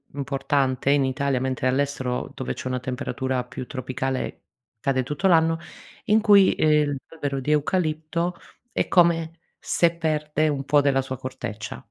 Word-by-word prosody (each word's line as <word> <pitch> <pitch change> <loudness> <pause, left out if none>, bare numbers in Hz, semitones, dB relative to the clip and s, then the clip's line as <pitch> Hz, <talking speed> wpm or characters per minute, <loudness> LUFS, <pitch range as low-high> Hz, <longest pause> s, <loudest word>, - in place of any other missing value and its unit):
importante 135 -1 0
in 140 -1 +4
Italia, 135 0 0
mentre 130 -1 -1
all'estero 130 -2 -1
dove 65 +1 -3
c'è - - -6
una 130 -1 -2
temperatura 130 -1 -2
più 125 - -7
tropicale 130 0 -3 0.4
cade 130 -2 +1
tutto 150 +8 -1
l'anno, 165 -2 +4 0.5
in 215 -1 +4
cui 205 -3 +6
eh 150 -1 +3 0.2
l'albero 145 -4 -3
di 140 +3 -2
eucalipto 160 +2 0 0.4
è - - 0
come 170 -2 +3 0.2
se 170 -1 +2
perde 155 -1 0
un 140 -2 -2
po' 145 0 +4
della 135 -1 +2
sua 130 -1 -5
corteccia. 115 - -6
140 Hz, 145 wpm, -24 LUFS, 130-160 Hz, 0.5 s, cui